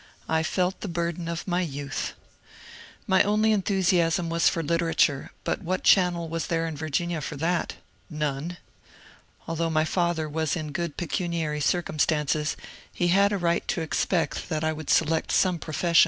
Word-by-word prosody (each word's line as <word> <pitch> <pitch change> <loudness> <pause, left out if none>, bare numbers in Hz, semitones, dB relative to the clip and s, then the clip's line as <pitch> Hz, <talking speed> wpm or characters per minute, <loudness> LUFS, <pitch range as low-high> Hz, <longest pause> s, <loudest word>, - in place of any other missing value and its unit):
I 160 0 +2
felt 180 +3 -1
the - - -4
bur 170 -1 -1
den 170 0 -7
of 170 0 -3
youth. 145 -6 -2 0.9
My 190 -3 +4
only 215 +2 +3
enthusiasm 180 -4 +2
was 170 0 +4
for 165 - -2
literature, 165 -3 +1
but - - -1
what 185 0 -2
channel 175 -3 +4
was 165 0 -3
there 165 -1 0
in 160 - -4
Virginia 160 +2 -2
for 150 - -5
that? 170 +5 -1 0.3
None. 150 +2 -3 0.9
Although 165 0 -1
my 155 -1 +2
father 170 -2 0
was 160 +1 -1
in 155 -3 -4
good 170 0 -3
pecuniary 165 -3 -2
circumstances, 155 -2 +1 0.3
he 175 - 0
had 200 +3 +4
a 205 - +1
right 170 -2 0
to - - -1
expect 160 +1 -1
that 155 -2 -1
I 160 0 +1
would 155 -1 -7
select 160 0 +2
some 180 -3 +3
profession. 165 +2 +2
165 Hz, 160 wpm, -26 LUFS, 155-175 Hz, 0.9 s, My